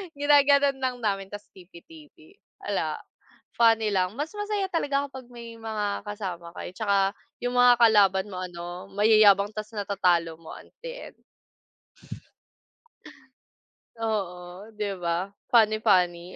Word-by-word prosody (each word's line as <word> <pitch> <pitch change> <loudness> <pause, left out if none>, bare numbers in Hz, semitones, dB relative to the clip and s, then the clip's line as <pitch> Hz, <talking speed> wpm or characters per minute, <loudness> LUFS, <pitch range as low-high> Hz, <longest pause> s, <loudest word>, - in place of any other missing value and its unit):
Ginagano'n 285 -1 +4
lang 260 -1 -1
namin 195 -2 -1
tas 205 +1 -9
TP-TP. 315 - -17 0.3
'Ala, - - -1 0.6
funny 225 -2 +4
lang. 185 0 0
Mas 295 +4 -4
masaya 415 -1 -2
talaga 285 -4 -1
kapag 260 -2 -10
may 235 -2 -11
mga 210 -2 -4
kasama 180 -5 -6
kayo - - -7
'tsaka 200 +1 0 0.5
'yung 245 - -1
mga 245 0 +6
kalaban 205 -4 +4
mo 185 - -6
ano 175 0 -7
mayayabang 205 -1 +5
tas 215 +1 -8
natatalo 180 -5 0
mo 165 - -11
at - - -15
the - - -7 0.2
end. - - -36 2.8
Oo, 195 -4 -4
'di 210 -1 -3
ba? 175 +3 -2 0.2
Funny-funny. 195 -6 +2
210 Hz, 120 wpm, -26 LUFS, 185-245 Hz, 2.8 s, mga